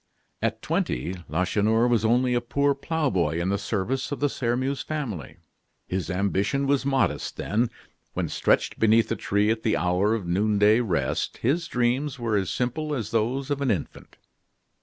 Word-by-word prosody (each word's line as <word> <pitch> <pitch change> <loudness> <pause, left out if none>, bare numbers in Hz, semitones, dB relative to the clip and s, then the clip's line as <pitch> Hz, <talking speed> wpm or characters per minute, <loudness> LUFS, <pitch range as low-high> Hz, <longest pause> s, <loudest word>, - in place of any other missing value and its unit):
At - - -1
twenty 75 +9 -1 0.2
Lacheneur 105 +8 +2
was 120 -3 +2
only 125 +3 +3
a 120 - +1
poor 140 +4 +1
ploughboy 140 - 0
in 90 +2 -1
the 100 0 0
service 110 +7 -2
of 145 - -3
the 145 - +2
Sairmeuse 130 +2 -1
family. 110 - -5 0.5
His 95 0 -3
ambition 100 +7 0
was 140 0 +1
modest 135 -1 0
then. 115 +3 0 0.4
When - - -1
stretched - - +1
beneath 110 +1 +4
a - - +2
tree 105 +2 +1
at 115 0 -1
the 110 - +1
hour 90 +5 +2
of 105 -5 -4
noonday 105 +4 +3
rest, 85 - -1
his 165 +8 +1
dreams 125 +3 0
were 115 -3 -1
as 95 -3 0
simple 145 +5 -2
as 115 -4 -4
those 125 +5 0
of 140 0 -1
an 135 - +1
infant. 95 -8 -4
115 Hz, 165 wpm, -25 LUFS, 100-135 Hz, 0.5 s, beneath